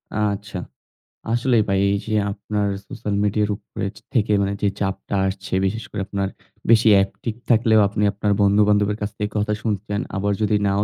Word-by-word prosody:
আচ্ছা। 100 -2 -2 0.7
আসলেই 120 -1 +3
ভাই 95 - +2
এইযে 100 +2 -2 0.2
আপনার 105 0 -2 0.2
সোশ্যাল 110 -5 -3
মিডিয়ার 105 +1 +1
উপরে 100 -1 -6 0.3
থেকে 110 -4 +2
মানে 100 0 0
যে 100 - +3
চাপটা 95 0 -2
আসছে, 95 0 -5
বিশেষ 105 +3 -2
করে 105 - -3
আপনার 100 -1 -1 0.4
বেশি 115 0 +6 0.2
একটিভ 110 +3 -5
থাকলেও 115 -1 +5
আপনি 105 +1 -2
আপনার 105 0 -1
বন্ধু-বান্ধবের 105 +1 +3
কাছ 105 - -1
থেকে 105 0 -2
কথা 105 +1 0
শুনতেছেন, 105 -1 -2
আবার 100 +1 0
যদি 105 0 +2
নাও 100 +1 +2
105 Hz, 160 wpm, -22 LUFS, 100-110 Hz, 0.7 s, বেশি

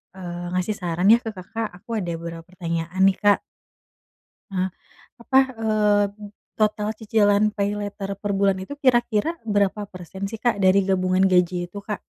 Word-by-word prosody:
eee, 175 -1 -6
ngasih 190 +3 -1
saran, 180 +2 +2
ya, 235 - +7
ke 225 -3 -7
Kakak, 220 +5 -4
aku 220 +4 -4
ada 175 -3 -3
beberapa 165 0 -7
pertanyaan, 175 0 -2
nih, 195 -1 +4
Kak. 205 -1 +4 1.1
Ah, 185 -1 0 0.5
apa, 265 +3 +2 0.3
eee, 210 -1 +3 0.6
total 210 0 +1
cicilan 210 -1 +3
paylater 205 -1 -3
per 205 -1 -1
bulan 195 -1 +3
itu 190 - -7
kira-kira 240 0 +3 0.2
berapa 205 0 +2
persen, 190 +2 -6
sih, 225 - -5
Kak, 240 -3 +3
dari 190 +1 +6
gabungan 185 0 +2
gaji 180 0 +3 0.2
itu, 205 - -9
Kak? 210 - -3
200 Hz, 155 wpm, -23 LUFS, 185-210 Hz, 1.1 s, ya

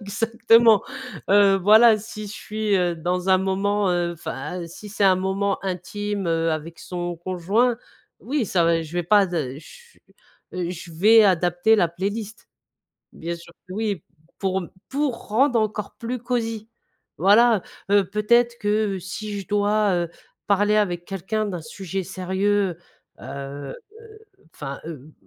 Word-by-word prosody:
exactement, 225 +1 +4 0.5
heu, 200 0 +5
voilà 215 +3 +7
si 215 0 -8
je 200 - -8
suis, 215 0 -1
heu, 175 -2 +1
dans 180 +3 -2
un 190 0 +5
moment, 195 +1 0
heu, 175 -1 0
enfin, 160 +2 -6
si 210 +5 -11
c'est 205 0 -4
un 190 -2 +5
moment 190 +1 -1
intime, 195 +1 -3
heu, 165 0 +1
avec 160 +2 -5
son 175 -1 -5
conjoint, 190 +8 0 0.4
oui 260 -2 -1
ça 175 -2 +2
va 165 0 +2
je 160 +1 -10
vais 175 - -1
pas 200 +3 +4
de 160 -8 -3
ch 475 - -16 0.5
je 175 -1 -5
vais 215 +6 +6
adapter 180 +3 +3
la 175 -5 +3
playlist, 200 +5 -5 0.6
bien 170 +1 -5
sûr 170 0 -15 0.2
que 185 - -7
oui, 210 -6 -2 0.4
pour 190 -1 -1 0.3
pour 275 -3 -2
rendre 235 +2 +3
encore 210 -1 -3
plus 245 +2 -4
cosy 230 -2 -3 0.5
voilà, 210 +3 +5 0.3
heu, 200 -1 +5
peut-être 235 +4 +2
que 205 -2 0
si 205 +3 -6
je 195 - -10
dois, 205 0 +2
heu, 175 -1 -1 0.4
parler 205 +1 +3
avec 175 -5 0
quelqu'un 195 +4 -3
d'un 180 -5 -4
sujet 190 +3 -5
sérieux, 190 0 -1 0.4
heu - - -11
heu 140 +1 -7 0.2
heu, 440 -1 -14 0.4
enfin, 140 -2 -6
heu, 155 -2 -9
195 Hz, 150 wpm, -23 LUFS, 175-215 Hz, 0.6 s, voilà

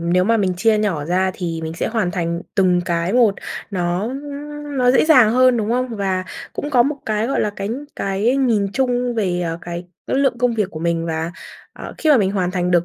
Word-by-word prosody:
nếu 175 +2 +2
mà 230 +2 +3
mình 190 -3 0
chia 220 +3 +3
nhỏ 190 -9 -1
ra 185 +4 +1
thì 165 -3 -4
mình 160 - -4
sẽ - - -2
hoàn 220 -6 0
thành 170 -1 -2
từng 185 -3 +3
cái 170 +1 -1
môt 235 -5 +4 0.4
nó, 175 -2 -1
ưm, 290 +2 -7
nó 250 -1 +4
dễ 260 - +4
dàng 255 -9 +6
hơn, 255 0 +4
đúng 220 -1 -1
không? 250 +2 0
Và 190 -2 -1 0.3
cũng 290 - -4
có 250 -4 +5
một 285 +4 -1
cái, 215 0 0
gọi 275 - 0
là, 210 - 0
cái 195 0 -3 0.3
cái 200 +7 0
nhìn 225 -7 +2
chung 245 -1 0
về, 185 -6 0
ờ, 165 -1 -3
cái 175 +1 -6 0.2
cái - - 0
lượng 270 -3 +1
công 245 -1 +1
việc 210 -4 -1
của 155 - -7
mình 170 0 -1
và, 160 +1 -3 0.4
ờ, - - -9
khi 315 - +2
mà 290 - +7
mình 195 -4 +1
hoàn 185 -3 0
thành 180 -1 -1
được 175 -1 +3
200 Hz, 235 wpm, -20 LUFS, 175-245 Hz, 0.4 s, mà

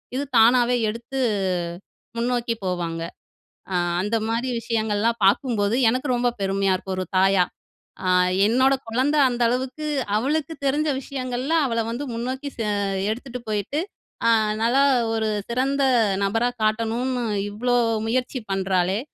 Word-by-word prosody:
இது 275 - -1
தானாவே 240 +2 +5 0.2
எடுத்து 235 +5 -5 1.0
முன்னோக்கி 240 0 0
போவாங்க. 175 -2 -2 0.7
அ - - +1 0.3
அந்த 210 +4 0
மாரி 235 +3 -1
விஷயங்கள்லாம் 225 0 0
பார்க்கும்போது, 210 0 +2
எனக்கு 255 +5 0
ரொம்ப 245 0 +1
பெருமையா 195 0 +1
இருக்கும் 190 +1 -5
ஒரு 185 - -1
தாயா. 190 -1 +4 0.6
"அ - - 0 0.4
என்னோட 260 +4 +3 0.2
குழந்தை 265 +6 +1
அந்த 245 -1 -3
அளவுக்கு 260 +5 -3 0.3
அவளுக்கு 295 +6 -1
தெரிஞ்ச 295 +3 +1
விஷயங்கள்ல 255 +2 -3
அவளை 230 -3 0
வந்து 250 +5 -4
முன்னோக்கி 260 +5 -4
செ 230 - -2 0.5
எடுத்துட்டு 250 +2 -6
போயிட்டு, 210 +7 -1 0.5
அ - - +5 0.3
நல்லா 240 +4 +3 0.3
ஒரு 220 -1 0 0.2
சிறந்த 270 +3 0 0.4
நபரா 225 +5 +1
காட்டணும்ன்னு, 230 +3 0 0.3
இவ்வளோ 245 +4 0 0.3
முயற்சி 255 +3 -1
பண்றாளே, 190 0 +1
235 Hz, 120 wpm, -23 LUFS, 215-255 Hz, 1.0 s, தானாவே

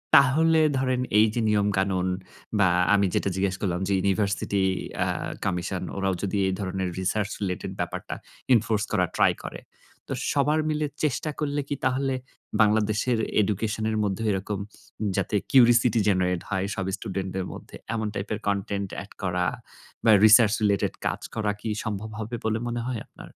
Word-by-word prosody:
তাহলে 160 +4 +5 0.2
ধরেন 130 -1 +1 0.2
এই 110 - +7
যে 120 - 0
নিয়মকানুন 95 -3 +1 0.5
বা 95 - +5 0.3
আমি 100 -1 +4
যেটা 100 - +1
জিজ্ঞেস 95 0 0
করলাম 90 -3 0
যে 100 - +1
ইউনিভার্সিটি 100 0 0 0.4
আ - - -1 0.4
কমিশন 90 0 -2
ওরাও 95 0 +1
যদি 100 0 -1
এই 95 - 0
ধরনের 95 -1 -2
research 105 +2 -1
related 90 -2 -3
ব্যাপারটা - - -4 0.4
enforce 115 -1 +2
করার 90 -5 +1
ট্রাই - - +5
করে। - - -6 0.5
তো - - -3 0.2
সবার 150 +2 +2
মিলে 150 0 0 0.2
চেষ্টা 150 +1 0
করলে 145 -1 -1
কি 145 - -2
তাহলে 135 +1 +1 0.5
বাংলাদেশের 110 +2 +2 0.2
এডুকেশন 105 +2 -1
এর 110 - -1
মধ্যেও 105 +2 -1
এরকম 100 +1 -2 0.6
যাতে 95 +1 -1 0.2
curiosity 120 -2 +5
generate 90 -2 +1
হয় 95 -1 0
সব 95 - -2
স্টুডেন্টদের 95 -2 -4
মধ্যে - - -11 0.2
এমন 110 -1 -1
টাইপের 105 +1 -3
content 100 0 -1 0.2
add 100 - -16
করা 90 -1 0 0.6
বা 115 - +6
research 110 0 +7
related 100 -2 +2
কাজ - - -2
করা 105 -2 0
কি 110 - -3
সম্ভব 110 0 -4
হবে 110 +2 -4
বলে 110 0 +1
মনে 120 0 -2
হয় 120 -4 -3
আপনার? - - -13
105 Hz, 155 wpm, -26 LUFS, 95-115 Hz, 0.6 s, এই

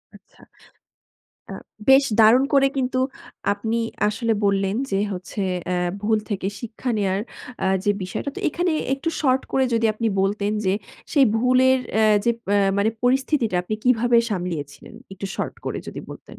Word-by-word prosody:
আচ্ছা। - - -20 1.1
আ - - -5 0.4
বেশ 270 +1 +7 0.2
দারুণ 230 +5 +6
করে 275 -1 +5
কিন্তু 255 -1 0 0.5
আপনি 220 +3 -2 0.3
আসলে 230 +2 -1
বললেন 195 0 +1
যে, 195 - +1
হচ্ছে 185 +2 -6 0.3
আ - - +1 0.3
ভুল 220 +1 +2
থেকে 195 -2 -2
শিক্ষা 235 +2 -5
নেওয়ার 195 -1 0 0.4
আ - - +2 0.2
যে, 205 - +3
বিষয়টা। 185 +9 -4
তো - - -4
এখানে 350 +3 -1 0.2
একটু 275 +4 -4
শর্ট 260 -3 +2
করে 265 - +3
যদি 230 0 +2
আপনি 225 +1 -2
বলতেন 200 +1 0
যে, 190 - +2 0.4
সেই 280 -3 +5
ভুলের 255 +2 +4 0.2
অ্যা 220 0 +4 0.2
যে, 235 - +4 0.2
অ্যা 200 -1 +3
মানে 205 +2 +2
পরিস্থিতিটা 255 -5 +1
আপনি 215 +4 -3
কিভাবে 245 -1 +3
সামলিয়েছিলেন 175 -7 -5 0.2
একটু 195 +1 -6
শর্ট - - -3
করে - - -3
যদি - - -6
বলতেন। - - -12
220 Hz, 160 wpm, -22 LUFS, 200-255 Hz, 1.1 s, বেশ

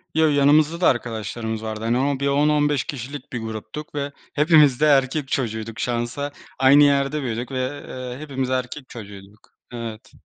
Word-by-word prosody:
Yo, 160 0 +4
yanımızda 150 +3 +3
da - - +5
arkadaşlarımız 110 -2 -2
vardı. 110 0 -5
Hani, 130 +4 +1
bir 140 - 0
10-15 145 0 +2
kişilik 140 -2 -7
bir 120 - -2
gruptuk 110 +8 -7
ve 140 0 -2 0.2
hepimiz 150 -4 +5
de - - +5
erkek 135 0 +3
çocuğuyduk 115 -4 -3
şansa. 120 +4 -2 0.3
Aynı 140 +2 +7
yerde 140 +1 +2
büyüdük 120 0 -4
ve 130 +2 -3
eee 125 -1 -6
hepimiz 135 -4 -3
erkek 130 +1 -3
çocuğuyduk. 100 -2 -12 0.2
Evet. 115 -2 -7
130 Hz, 150 wpm, -22 LUFS, 115-145 Hz, 0.3 s, Aynı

